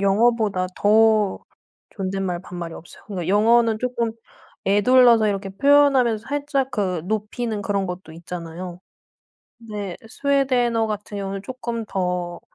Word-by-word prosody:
영어보다 205 -1 +2
더 215 -1 +4 0.5
존댓말 190 -2 -3
반말이 175 -3 -7
없어요. 170 - -13
그니까 185 -5 -4
영어는 225 +2 +4
쪼끔 240 -2 -1 0.5
에둘러서 230 +2 +5
이렇게 195 -1 -2
표현하면서 265 -2 +3
살짝 280 -2 -1
그 185 -8 -1
높이는 215 +1 -2
그런 200 -1 -1
것도 180 -2 -7
있잖아요. 170 +1 -7 0.9
네. 200 -4 -4
스웨덴어 250 -3 +1
같은 210 -1 -5
경우는 195 0 -4
쪼끔 235 -1 -5
더 180 -2 -2
210 Hz, 290 characters per minute, -22 LUFS, 190-235 Hz, 0.9 s, 에둘러서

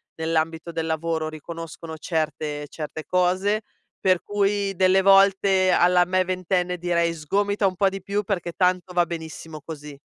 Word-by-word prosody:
nell'ambito 160 +1 -1
del 165 -1 -3
lavoro 160 0 -1
riconoscono 165 +1 -8
certe 155 -2 -3
certe 155 0 -6
cose. 185 +4 +1 0.4
Per 185 -2 +2
cui 200 -1 0
delle 190 +1 +4
volte 195 -1 +5
alla 180 0 +4
me 185 +1 +1
ventenne 180 0 -1
direi: 170 -1 0
"Sgomita 200 +6 0
un 185 - -2
po' 195 +1 +3
di 195 0 -7
più, 200 +2 -2
perché 175 -4 -3
tanto 180 0 +1
va 175 -1 +3
benissimo 160 -2 -7
così". 150 -2 -9
175 Hz, 150 wpm, -24 LUFS, 160-190 Hz, 0.4 s, volte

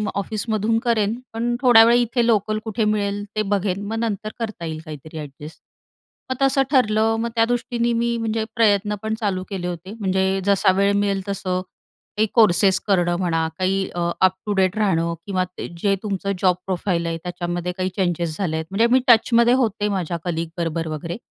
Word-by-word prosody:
ऑफिसमधून 215 +2 -1
करेन, 225 0 +1
पण 240 +1 -1
थोड्या 240 -3 +8
वेळ, 235 +1 +5
इथे 240 0 +1
लोकल 215 -1 +1
कुठे 220 0 -1
मिळेल 205 -1 0
ते 215 - +1
बघेन. 200 0 -1
मग 225 +1 -3
नंतर 215 -2 -2
करता 215 -7 -4
येईल 160 -1 -4
काहीतरी 155 +1 -9
अ‍ॅडजस्ट. 150 +2 -10 0.7
मग - - 0
तसं 270 0 +3
ठरलं. 225 -4 +3
मग 235 +1 -1
त्या 225 0 +4
दृष्टीने 240 0 -1
मी, 235 0 0
म्हणजे 225 -1 -1
प्रयत्न 210 -2 +2
पण 220 0 -1
चालू 190 -4 -1
केले 185 -3 -4
होते. 180 +3 -6
म्हणजे 190 0 0
जसा 195 -1 +4
वेळ 200 0 +3
मिळेल 200 -1 0
तसं 185 -2 -2 0.6
काही 220 +1 +3
कोर्सेस 195 -3 +5
करणं 175 -3 +2
म्हणा, 165 -3 0
काही, 190 +1 0
अ, 175 - -2 0.2
अप-टू-डेट 190 +1 +1
राहणं, 170 -5 +1
किंवा 185 -2 0
ते 180 - -8
जे 200 -1 +2
तुमचं 200 -1 -2
जॉब 180 -2 +4
प्रोफाइल 180 -2 -1
आहे, 165 - -2
त्याच्यामध्ये 175 0 -3
काही 185 0 -1
चेंजेस 170 -4 -1
झाले 170 -5 -1
आहेत. 160 - -3
म्हणजे 225 +4 +3
मी 260 - +6
टचमध्ये 235 +1 +5
होते 210 -1 -1
माझ्या 180 -3 -2
कलीग 165 -1 -2
बरोबर 165 -1 -2
वगैरे. 160 +3 -5
200 Hz, 175 wpm, -22 LUFS, 180-220 Hz, 0.7 s, थोड्या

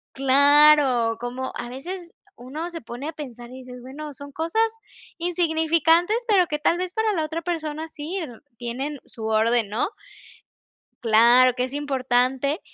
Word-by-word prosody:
Claro, 275 -3 +5
como, 250 +2 -5
a 240 - -5
veces 340 +8 -8 0.2
uno 290 +7 -7
se 335 -1 -7
pone 240 +5 -7
a - - -5
pensar 245 -6 -9
y 260 +1 -10
dices: 250 0 -11
"Bueno, 290 +4 -8
son 285 +1 -10
cosas 330 +9 0 0.6
insignificantes.", 335 +2 +2
pero 395 -6 +4
que 300 - -2
tal 335 +3 +1
vez 365 0 -3
para 440 -1 +1
la 325 -5 -1
otra 320 +2 -4
persona 315 -2 -4
sí, 315 +4 -7
n 265 -11 -7 0.2
tienen 265 +5 -4
su 220 -2 -7
orden, 220 0 +2
¿no? 225 - -1 1.1
Claro 240 +3 +5
que 250 0 -1
es 255 - -6
importante, 265 - 0
285 Hz, 155 wpm, -23 LUFS, 250-325 Hz, 1.1 s, Claro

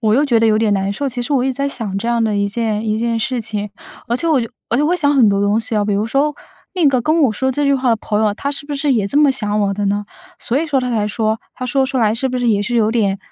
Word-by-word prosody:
我 220 -1 +2
又 280 - +3
觉 245 -6 +2
得 225 - +3
有 215 -1 +3
点 215 -2 +2
难 195 +1 -1
受， 280 +6 -2
其 245 -1 -4
实 285 - -3
我 260 -3 +2
一 265 - 0
直 260 - -2
在 280 +1 -1
想 220 -8 -4
这 220 +4 -3
样 235 -1 +1
的 215 -2 0
一 200 0 +1
件 220 0 -2
一 215 0 0
件 230 0 0
事 245 +1 -1
情。 210 -2 -4 0.4
而 235 - -1
且 335 +6 -1
我 300 -4 +3
就 230 -2 -3 0.2
而 235 - +1
且 290 - +2
我 300 - +2
会 360 - +2
想 285 -2 +2
很 230 -6 +5
多 200 0 +1
东 205 +2 +2
西 225 0 -3
啊。 210 - +2
比 205 -1 0
如 205 +2 0
说， 280 +5 0 0.4
那 345 -5 +2
个 260 -3 +3
跟 310 +6 +1
我 245 -6 +3
说 265 +5 -1
这 290 +3 -1
句 280 0 +3
话 260 -1 0
的 230 - +3
朋 210 0 -2
友 220 - +3
啊， 205 - 0
他 280 - -3
是 285 +1 -6
不 290 - -4
是 280 0 +1
也 210 -5 +1
这 280 - -3
么 295 -2 +5
想 210 -4 -1
我 200 -1 +1
的 205 0 -2
呢？ 205 +1 -1 0.3
所 250 +4 -1
以 330 - -2
说 280 -3 +1
他 250 -1 -2
才 210 -2 0
说 220 +1 -1
他 255 - -6
说 265 +1 +1
出 265 0 -4
来 220 -2 +2
是 265 +3 -1
不 255 0 -2
是 245 -1 0
也 205 -2 +2
是 240 +3 -2
有 220 -1 +3
点， 200 -4 0
230 Hz, 365 characters per minute, -18 LUFS, 210-270 Hz, 0.4 s, 很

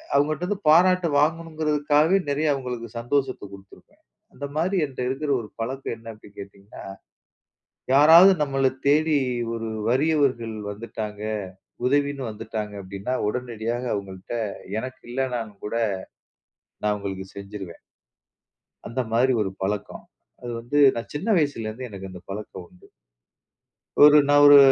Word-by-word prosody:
அவுங்கட்டருந்து 155 +7 +1
பாராட்டு 180 +2 +5
வாங்கணும்ங்கறதுக்காகவே, 155 +1 +2
நெறைய 150 +2 0
அவங்களுக்கு 125 -3 -5
சந்தோஷத்தை 130 +2 -1
குடுத்திருப்பேன். 95 0 -16 0.3
அந்த 145 - -6
மாதிரி 175 +5 0
என்ட்ட 135 -3 -11
இருக்கிற 145 +3 -3
ஒரு 110 - -9
பழக்கம் 130 +2 -3
என்ன 115 0 -10
அப்பிடி 105 -1 -16
கேட்டீங்கன்னா, 100 0 -11 1.1
யாராவது 165 +7 +8
நம்மள 135 -2 +1 0.2
தேடி, 155 +1 +3 0.4
ஒரு 115 0 -4 0.2
வறியவர்கள் 130 -4 +1 0.2
வந்துட்டாங்க. 105 -1 -6 0.7
உதவின்னு 140 0 +1
வந்துட்டாங்க, 105 -1 -5
அப்பிடின்னா 100 +6 -4
உடனடியாக 120 +1 -3
அவுங்கள்ட்ட 100 +3 -5 0.4
எனக்கு 130 +1 -7
இல்லனாலும் 120 -5 -3
கூட, 105 - -4 1.1
நான் 105 0 +2
அவுங்களுக்கு 95 -2 -5
செஞ்சுருவேன். 100 -3 -8 1.1
அந்த 130 +3 -2
மாதிரி 125 +3 +3
ஒரு 100 - -1
பழக்கம். 100 +2 -3 0.4
அது 120 -1 -6
வந்து 120 +5 -3 0.2
நான் 115 -3 -6
சின்ன 170 +9 -4
வயசுல 140 -7 -1
இருந்தே 125 +4 -7
எனக்கு 95 -1 -8
அந்த 90 -1 -10
பழக்கம் 95 -3 -7
உண்டு. 90 - -21 1.1
ஒரு 150 0 +9
நான் 145 0 +6
ஒரு 145 0 +10
125 Hz, 120 wpm, -24 LUFS, 105-145 Hz, 1.1 s, ஒரு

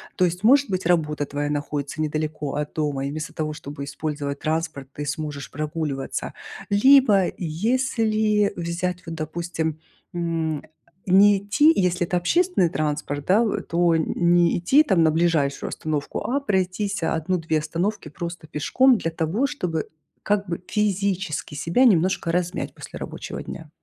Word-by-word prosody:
То 185 - +3
есть, 180 +3 -3
может 270 +1 +5
быть, 185 -2 -2
работа 150 -4 +1
твоя 145 +1 -3
находится 145 0 -3
недалеко 155 -1 -2
от 150 0 -3
дома 145 -3 -1
и - - -3
вместо 155 0 -5
того, 155 -1 -3
чтобы 145 -2 -7
использовать 145 0 -4
транспорт, 155 -4 -2
ты 145 - -5
сможешь 145 -1 -4
прогуливаться. 150 -2 -3 0.4
Либо 210 -2 +6
если 215 +3 +1
взять, 175 +1 -3
вот 165 0 -6
допустим, 160 0 -3 0.3
м, 165 -3 -1
а, - - -13 0.5
не 200 +2 +6
идти 210 +11 +4
если 180 -1 +1
это 180 - 0
общественный 335 - +2
транспорт, 145 -2 -2
да, 200 +5 +4
в 215 - -1
то 170 0 +2
не 170 +2 +2
идти 275 - +5
там 185 - +3
на 160 - +4
ближайшую 160 -4 +1
остановку, 150 -2 -3
а 275 +3 +1
пройтись 200 -2 -1
1-2 160 -1 0
остановки 170 +3 -2
просто 170 +1 -6
пешком 250 - +3
для 165 - -2
того, 165 - 0
чтобы, 180 - -3 0.4
как 200 -1 0
бы, 170 0 -3
физически 195 -6 -1
себя 170 - +2
немножко 185 -4 +3
размять 180 +1 -2
после - - -9
рабочего - - -6
дня. - - -8
170 Hz, 150 wpm, -23 LUFS, 155-200 Hz, 0.5 s, Либо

